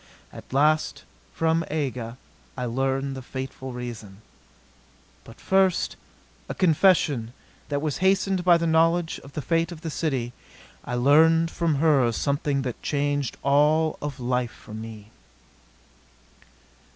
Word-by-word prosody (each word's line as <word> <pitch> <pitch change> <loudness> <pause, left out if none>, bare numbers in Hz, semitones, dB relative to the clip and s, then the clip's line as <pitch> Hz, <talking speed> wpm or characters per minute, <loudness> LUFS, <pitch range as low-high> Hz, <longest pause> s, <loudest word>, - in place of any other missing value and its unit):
At - - -12
last, 155 +3 +2 0.3
from 165 0 +1
Aga, 125 -6 -3 0.4
I 125 - -2
learned 135 +3 -1
the 130 - -6
fateful 130 +1 -6
reason. 115 -5 -8 1.0
But 115 - -15
first 190 -2 +2 0.5
a - - -4
confession 155 - +3 0.4
that 145 0 -1
was 150 -3 -2
hastened 190 0 +2
by 175 -1 +6
the 170 - -2
knowledge 165 +1 +2
of 140 - -13
the 150 - -4
fate 165 +1 0
of 165 -2 -9
the 165 -2 -4
city 130 -7 -2 0.5
I 125 - -4
learned 160 +6 +4
from 165 -3 0
her 140 -5 +3
something 140 +2 -1
that 125 -3 -5
changed 145 -2 -1
all 150 +3 +3
of 145 -2 -5
life 125 0 -1
for 105 - -14
me. 110 -1 -9
145 Hz, 130 wpm, -25 LUFS, 125-160 Hz, 1.0 s, by